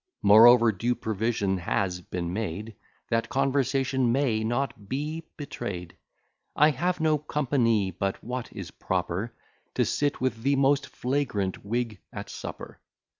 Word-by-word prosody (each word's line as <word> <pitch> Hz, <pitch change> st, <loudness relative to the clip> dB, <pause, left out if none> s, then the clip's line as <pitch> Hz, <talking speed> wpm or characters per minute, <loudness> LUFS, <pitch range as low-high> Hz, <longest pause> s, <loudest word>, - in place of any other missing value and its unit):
Moreover, 115 Hz, +3 st, +8 dB
due 115 Hz, +5 st, -1 dB
provision 110 Hz, -3 st, -1 dB
has 90 Hz, +1 st, -1 dB
been 85 Hz, -1 st, -4 dB
made, 105 Hz, +1 st, -4 dB, 0.4 s
That 115 Hz, 0 st, +1 dB
conversation 135 Hz, -2 st, +1 dB
may 120 Hz, -4 st, +1 dB
not 120 Hz, -3 st, -2 dB
be 155 Hz, +4 st, -3 dB
betray'd; 90 Hz, -, -6 dB, 0.6 s
I 150 Hz, +1 st, +5 dB
have 175 Hz, +6 st, -1 dB
no 155 Hz, -1 st, +2 dB
company 120 Hz, -9 st, +1 dB
but 95 Hz, +2 st, -3 dB
what 125 Hz, +1 st, -5 dB
is 95 Hz, -7 st, -7 dB
proper 100 Hz, +8 st, -2 dB, 0.4 s
To -, -, +2 dB
sit 145 Hz, 0 st, 0 dB
with 125 Hz, -3 st, -1 dB
the 140 Hz, +3 st, +2 dB
most 140 Hz, +1 st, +3 dB
flagrant 125 Hz, -8 st, -2 dB
Whig 115 Hz, -1 st, -2 dB
at -, -, -7 dB
supper. -, -, -8 dB
120 Hz, 130 wpm, -27 LUFS, 100-135 Hz, 0.6 s, Moreover